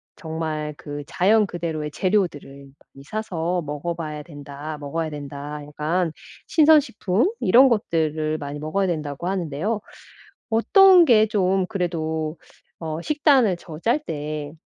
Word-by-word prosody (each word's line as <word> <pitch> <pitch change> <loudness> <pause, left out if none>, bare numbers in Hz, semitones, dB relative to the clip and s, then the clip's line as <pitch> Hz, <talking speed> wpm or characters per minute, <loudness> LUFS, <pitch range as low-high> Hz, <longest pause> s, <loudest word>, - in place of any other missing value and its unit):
정말 160 -3 -4
그 145 0 -7
자연 210 +4 +3
그대로의 160 -4 -4
재료들을 145 -8 -2 0.2
많이 135 - -13
사서 180 -2 -2
먹어 150 +4 -4
봐야 155 -2 -5
된다 145 0 -8
먹어야 155 +3 -3
된다 145 0 -7
약간 155 +4 -1 0.4
"신선 315 -1 +6
식품 230 - 0
이런 250 +8 +6
것들을 155 -8 0
많이 145 0 -6
먹어야 190 +6 -1
된다."고 155 -1 -3
하는데요. 190 +3 -2 0.7
어떤 365 - +6
게 220 -6 +5
좀 190 -2 +1
그래도 160 -4 -2 0.4
어 160 0 -4
식단을 280 - +3
저 160 -3 -10
짤 230 - +2
때 150 -1 -5
165 Hz, 265 characters per minute, -23 LUFS, 150-200 Hz, 0.7 s, 신선